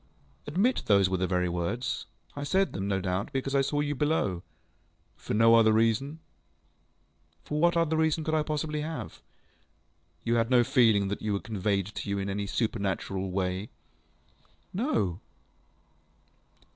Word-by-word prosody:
ŌĆØ 145 - -7
ŌĆ£Admit 235 +8 +2
those 100 -3 +4
were 95 - +1
the 95 0 0
very 90 0 +1
words. 90 +9 -2 0.3
I 145 - -4
said 190 +7 +1
them, 100 0 -3
no 100 -1 0
doubt, 95 +4 -2
because 135 0 -2
I 140 - +4
saw 145 +2 0
you 145 0 -1
below. 140 - 0 0.7
ŌĆØ - - -29
ŌĆ£For - - -3
no 115 +1 +6
other 115 -1 +6
reason? 115 +7 +1 1.3
ŌĆØ 150 - -2
ŌĆ£What 170 0 +4
other 160 -1 +2
reason 160 0 +1
could 155 - -2
I 155 - +3
possibly 150 0 -2
have? 160 +1 -6 1.0
ŌĆØ 115 - 0
ŌĆ£You - - +4
had 115 0 +1
no 125 -2 +5
feeling 110 -6 +3
that 100 - -3
they 110 - -4
were 100 -1 0
conveyed 100 -3 -1
to - - -5
you 100 - 0
in 100 0 -2
any 100 +1 -3
supernatural 95 -3 -2
way? 95 +2 -2 1.1
ŌĆØ 200 - -1
ŌĆ£No. 95 - 0
115 Hz, 170 wpm, -28 LUFS, 100-150 Hz, 1.3 s, no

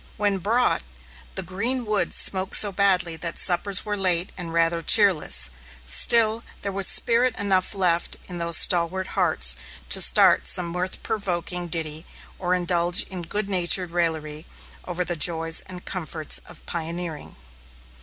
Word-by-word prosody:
When 205 -2 -1
brought, 230 +7 0 0.5
the - - -3
green 230 +8 -3
wood 210 -2 -1
smoked 190 0 +1
so 205 - +7
badly 185 -4 +1
that 170 +1 -4
suppers 190 +2 -1
were 210 -1 -3
late 185 -2 0
and 175 -3 -8
rather 165 0 0
cheerless; 155 - +3 0.3
still 220 - +2 0.2
there 200 - -4
was 195 0 0
spirit 240 +1 +2
enough 195 -2 -1
left 175 -3 0
in 175 -1 -8
those 170 -1 +5
stalwart 185 +1 +3
hearts - - +2 0.3
to - - +3
start - - +4
some 175 -2 +5
mirth 180 +2 -5
provoking 180 -4 -4
ditty, 160 -1 -5 0.3
or 180 -1 -1
indulge 175 0 0
in 185 -2 -7
good 205 +5 -5
natured 180 -2 +2
raillery 160 -2 -4 0.4
over 180 0 -4
the 175 - -4
joys 165 0 +2
and 185 -1 -11
comforts 160 -4 -2
of 175 - -12
pioneering. 165 -1 -7
180 Hz, 145 wpm, -22 LUFS, 170-195 Hz, 0.5 s, so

